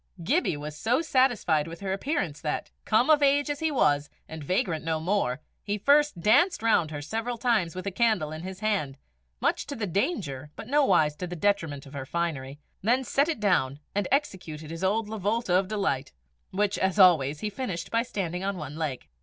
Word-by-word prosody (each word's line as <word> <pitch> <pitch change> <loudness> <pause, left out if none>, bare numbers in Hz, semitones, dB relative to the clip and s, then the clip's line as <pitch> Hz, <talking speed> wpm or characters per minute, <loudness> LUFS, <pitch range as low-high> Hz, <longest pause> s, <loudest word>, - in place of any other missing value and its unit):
Gibbie 270 - +1
was 150 +1 -6
so 240 - +1
satisfied 245 - +2
with 165 +1 -8
her 190 -1 -2
appearance 195 - -2
that, 150 - -3
come 240 +7 +3
of 300 -1 +5
age 285 +1 +3
as 290 - -4
he 320 - +1
was, 150 - +2 0.2
and 160 -1 -8
vagrant 165 0 0
no 160 -1 -1
more, 160 -7 0 0.2
he 205 0 -2
first 285 -1 +3
danced 230 - +3
round 200 -8 +3
her 145 -2 -6
several 225 +8 -3
times 220 -10 +1
with 185 - -5
a 200 - -2
candle 215 -7 +1
in 155 0 -6
his 185 +2 -7
hand, 195 -11 -1 0.4
much - - 0
to 285 - -5
the 225 - -2
danger 170 - -2
but - - -8
nowise 190 - +3
to 180 - -4
the 175 - -6
detriment 165 -6 0
of 140 - -13
her 135 -2 -6
finery, 145 -5 -3 0.2
then 245 +6 +2
set 280 +4 +1
it 315 - -2
down, 145 -10 +1
and 205 -2 0
executed 175 - -2
his 165 +2 -6
old 210 +3 +1
lavolta 215 -1 -1
of 185 +1 +3
delight, 195 -10 -1 0.4
which, 205 +1 0
as 190 +1 0
always, 155 -7 +5
he 215 - -1
finished 195 -6 -4
by 230 - +3
standing 185 -6 -3
on 200 -1 -2
one 150 -2 -7
leg. 150 -6 -3
190 Hz, 200 wpm, -27 LUFS, 155-230 Hz, 0.4 s, of